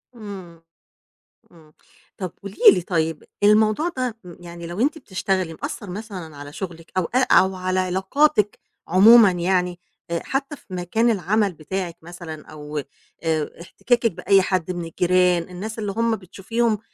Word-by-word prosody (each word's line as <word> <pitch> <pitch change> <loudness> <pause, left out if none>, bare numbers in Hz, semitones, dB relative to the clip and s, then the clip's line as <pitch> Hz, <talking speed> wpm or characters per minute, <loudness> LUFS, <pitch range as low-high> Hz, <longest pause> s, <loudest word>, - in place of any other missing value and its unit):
امم، 190 -7 -10 0.9
امم، 160 -3 -20 0.4
طَب 185 -3 -5
قولي 200 0 -8 0.2
لي 180 - -1
طيّب، 165 -3 -1 0.2
الموضوع 215 +8 +4
ده 250 -3 -2
م 175 -2 -11
يعني 170 -1 -9
لو 175 +5 -5
أنتِ 300 +5 +1
بتشتغلي 185 - -2
مأثّر 200 - -5
مثلًا 185 -6 -7
على 145 0 -9
شغلِك 170 -2 -7
أو 185 - +2
أ 245 +9 0
أو 190 0 +5
على 185 0 0
علاقاتِك، 200 +5 +1 0.3
عمومًا 205 +4 +8
يعني، 180 0 0 0.3
آآ، 170 0 -1
حتّى 275 +2 -2
في - - -23
مكان 200 +7 +1
العمل 205 0 +1
بتاعِك 175 +2 -5
مثلًا 165 -2 -9
أو 150 0 -7 0.4
آآ، 160 -2 0
احتكاكِك 235 +5 0
بأي 195 +3 +3
حد 185 -2 -1
من 175 -1 -3
الجيران 180 +1 +2
الناس 215 +5 -6
اللي 205 -2 -2
هُم 230 +2 +1
بتشوفيهم، 215 +4 -1
185 Hz, 150 wpm, -22 LUFS, 170-215 Hz, 0.9 s, عمومًا